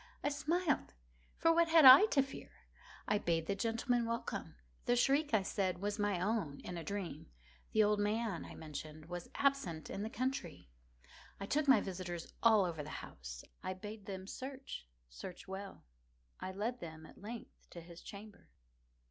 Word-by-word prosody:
I - - +2
smiled,—for 285 - -1
what 335 0 +4
had 320 -2 +7
I 265 +12 +12
to 280 -10 +3
fear? 270 - -9 0.6
I 210 - +2
bade 165 -3 0
the 200 - 0
gentlemen 230 +3 0
welcome. 230 - -3 0.3
The 245 - +3
shriek, 280 +4 +3
I 215 -4 +3
said, 190 -2 0
was 205 +2 -2
my 205 -3 +1
own 190 -7 -1
in 180 - -6
a 170 - -4
dream. 200 +1 -4 0.4
The 215 - +5
old 210 0 +3
man, 210 -2 0
I - - -9
mentioned, 155 0 -7
was 175 +1 -6
absent 275 - 0
in 195 - -3
the 215 - -2
country. 235 - -3 0.7
I 195 - -4
took 290 +8 +1
my 265 - +7
visitors 175 -3 -5
all 220 -4 +6
over 165 -4 -3
the 150 - -7 0.2
house. - - -9 0.2
I 185 - -3
bade 210 +1 -8
them 190 -1 -5
search—search 60 - -8
well. 195 +1 -7 0.6
I 185 - -4
led 220 +6 -2
them, 160 -1 -8
at - - -15
length, 225 +3 -9
to 175 - -9
his 170 0 -11
chamber. 205 +1 -11
200 Hz, 165 wpm, -36 LUFS, 170-245 Hz, 0.7 s, I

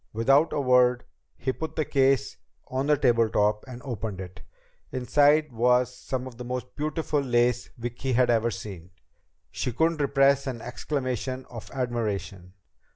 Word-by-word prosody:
Without 135 +8 +3
a - - -1
word, 125 -2 +4 0.3
he 130 - -1
put 160 +3 -6
the 155 - 0
case 135 -1 +2 0.3
on 130 +2 -1
the 150 -1 +4
tabletop 110 -5 +2
and 125 0 -9
opened 110 -6 -4
it. 95 0 -9 0.5
Inside 145 +4 +3
was 125 +2 +2
some 130 0 -4
of 125 -3 -10
the 125 - -6
most 125 0 -5
beautiful 155 0 -1
lace 120 -2 +1
Vicki 120 +2 -3
had 125 0 +4
ever 115 0 +2
seen. 95 -6 -8 0.6
She 125 - -2
couldn't 160 +5 +1
repress 140 0 +3
an 125 -3 -3
exclamation 130 0 -3
of 115 -3 -9
admiration. 105 -8 -3
125 Hz, 150 wpm, -26 LUFS, 115-135 Hz, 0.6 s, word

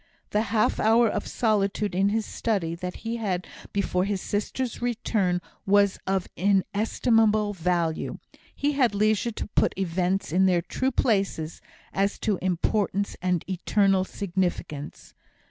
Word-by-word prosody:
The 210 - +2
half 215 0 +2
hour 225 +2 +5
of - - -2
solitude 210 -2 0
in 195 +2 +2
his 220 +1 0
study, 195 -8 -1
that 180 +1 -5
he 230 +1 -1
had 185 -5 -2 0.3
before 190 -2 0
his 200 0 -1
sister's 220 +6 -3
return, 215 -7 0 0.3
was 200 0 +4
of 190 -1 0
inestimable 210 +2 +2
value; 170 -3 -1 0.4
he 290 +1 +1
had 255 -7 +2
leisure 215 +2 +2
to 220 - -5
put - - +1
events 185 0 0
in 190 +1 +4
their 175 -2 +2
true 260 +8 -1
places, 195 -10 0 0.3
as 200 +1 +1
to 210 -4 0
importance 195 +2 0
and 180 -2 0
eternal 195 +1 +2
significance. 180 -7 -4
200 Hz, 135 wpm, -26 LUFS, 180-215 Hz, 0.4 s, hour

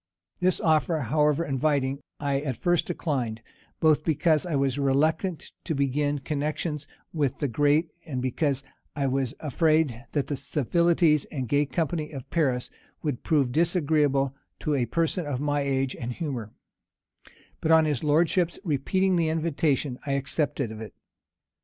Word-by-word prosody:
This 185 0 +2
offer, 160 0 +2
however 150 +5 +2
inviting, 140 -1 0 0.2
I 140 -1 0
at 135 -4 -3
first 175 -2 +1
declined; 125 -10 -2 0.4
both 155 -1 +4
because 160 +1 +2
I 165 - -1
was 135 0 +1
reluctant 155 +6 +1
to 160 - -1
begin 145 +1 +1
connections 150 +1 -3 0.3
with 145 -4 0
the 145 - -1
great, 145 +6 +2 0.2
and 130 -5 -3
because 135 +2 0 0.3
I 140 - 0
was 135 -2 0
afraid 155 -4 +1
that 145 -3 +1
the 145 - -2
civilities 160 +2 +2
and 130 -4 -4
gay 145 +3 +2
company 155 0 -1
of 135 -3 -7
Paris 130 -7 0 0.3
would 145 -6 -2
prove 140 -6 +2
disagreeable 150 -4 +2 0.3
to 150 - 0
a 125 -4 +1
person 165 - 0
of 135 -3 -2
my 145 0 0
age 135 -1 0
and 120 0 -4
humor; 125 -6 -4 1.1
but 160 - -2
on 160 -1 +6
his 150 -3 -1
lordship's 165 +3 +2
repeating 185 +4 +1
the 165 -2 +2
invitation, 155 -4 0
I 140 -1 -2
accepted 140 -2 -1
of 110 0 -8
it. 110 - -9
145 Hz, 150 wpm, -26 LUFS, 135-160 Hz, 1.1 s, on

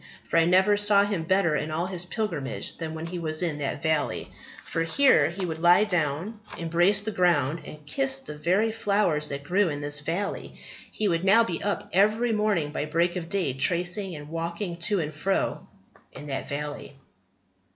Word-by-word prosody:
For - - -1
I 165 - +4
never 190 +4 +4
saw 205 -1 +5
him 200 -5 -2
better 185 -3 +2
in 150 +1 -2
all 160 +3 -1
his 180 -2 -2
pilgrimage 175 - -4
than 160 -1 -4
when 160 +1 -5
he 175 +1 -5
was 155 0 -1
in 155 -4 -2
that 145 0 -3
valley. 155 -2 -1 0.3
For 165 - -2
here 265 +12 +4
he 185 +2 -4
would 160 -2 -4
lie 175 +4 +6
down, 180 +2 -1 0.2
embrace 175 +5 +2
the 220 +1 -3
ground, 170 -5 +2
and 150 -1 -11
kiss 135 -2 -1
the 135 +3 -8
very 185 +9 +1
flowers 200 -9 0
that 140 0 -5
grew 185 +4 +2
in 145 -2 -4
this 145 0 -3
valley. 170 +7 -4 0.3
He 215 - -1
would 170 -2 0
now 200 +4 +6
be 180 -7 -4
up 205 0 -2
every 215 +5 +3
morning 210 -8 0
by 150 - -2
break 170 +3 0
of 170 -2 -5
day, 185 -9 0
tracing 175 +6 0
and 145 0 -9
walking 170 +2 -4
to 185 +3 +2
and 155 -2 -3
fro 190 +6 -1 0.4
in - - -10
that 135 -2 -4
valley." 145 0 -5
170 Hz, 190 wpm, -26 LUFS, 150-200 Hz, 0.4 s, lie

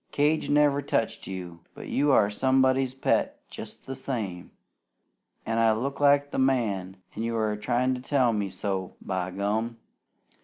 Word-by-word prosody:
Cage 150 +2 +1
never 145 -1 +4
touched 115 -5 -1
you! 90 -3 -6 0.2
But - - -9
you 145 +1 +2
are 105 -6 +5
somebody's 130 +2 +2
pet 135 - 0
jest - - -9
the 135 - -5
same. 110 -10 -4 1.0
An' 115 0 0
I 115 -1 +4
look 135 +5 -3
like 145 0 +4
the - - -2
man, 105 -8 0 0.2
an' 110 - -4
you 115 0 -1
are 110 -1 0
tryin' 120 +4 0
to 125 - -5
tell 130 -3 +2
me 100 -2 -1
so, 95 -2 -3
by 90 -1 -3
gum!" 105 +5 -2
115 Hz, 160 wpm, -27 LUFS, 100-135 Hz, 1.0 s, are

